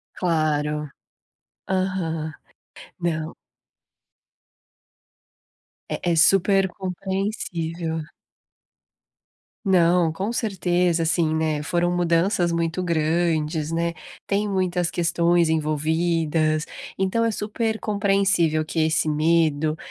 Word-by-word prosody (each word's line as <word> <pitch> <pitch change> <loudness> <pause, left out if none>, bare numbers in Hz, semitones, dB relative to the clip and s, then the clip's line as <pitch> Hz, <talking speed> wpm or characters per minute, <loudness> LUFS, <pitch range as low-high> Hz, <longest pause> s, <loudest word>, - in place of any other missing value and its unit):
Claro. 150 -3 0 0.8
Aham. 180 -4 -2 0.7
Não. 160 -2 -2 2.6
É 175 - -1
é - - +1
super 195 +3 +4
compreensível. 180 -3 -3 1.7
Não, 175 -3 +4
com 190 +8 -3
certeza, 180 -6 0
assim, 165 -1 +1
né, 155 -2 0
foram 175 +2 0
mudanças 175 +1 +2
muito 170 +1 -1
grandes, 160 -2 0
né, 170 +1 0 0.3
tem 205 +1 0
muitas 180 -3 0
questões 170 0 +2
envolvidas, 155 0 0 0.3
então, 195 +5 +1
é 230 - +2
super 220 +1 -2
compreensível 195 -7 +1
que 160 - -5
esse 155 0 +2
medo, 155 0 +2
170 Hz, 85 wpm, -23 LUFS, 160-185 Hz, 2.6 s, super